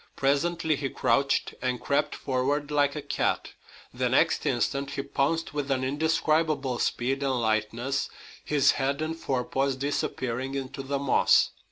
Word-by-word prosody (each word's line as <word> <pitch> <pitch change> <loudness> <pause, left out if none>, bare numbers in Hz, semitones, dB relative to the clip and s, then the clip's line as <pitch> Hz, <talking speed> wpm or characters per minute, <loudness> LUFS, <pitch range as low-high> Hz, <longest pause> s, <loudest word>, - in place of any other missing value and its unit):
Presently 155 +3 +1
he 135 -1 -2
crouched 140 +1 +1
and 125 -1 -1
crept 140 - 0
forward 140 +3 -1
like 145 -1 +2
a 150 - -4
cat. - - -1 0.4
The - - 0
next - - +2
instant 140 0 0
he 140 0 -3
pounced 145 +4 -1
with 145 -1 -3
an 130 -1 +1
indescribable 155 -1 +1
speed 135 +3 0
and 135 -2 0
lightness, 115 +4 0 0.3
his 145 -3 +4
head 140 +2 -1
and 160 +1 -2
forepaws 135 -2 -1
disappearing 130 -1 -2
into 135 0 -4
the 140 +1 -2
moss. 140 -1 +4
140 Hz, 145 wpm, -27 LUFS, 130-145 Hz, 0.4 s, his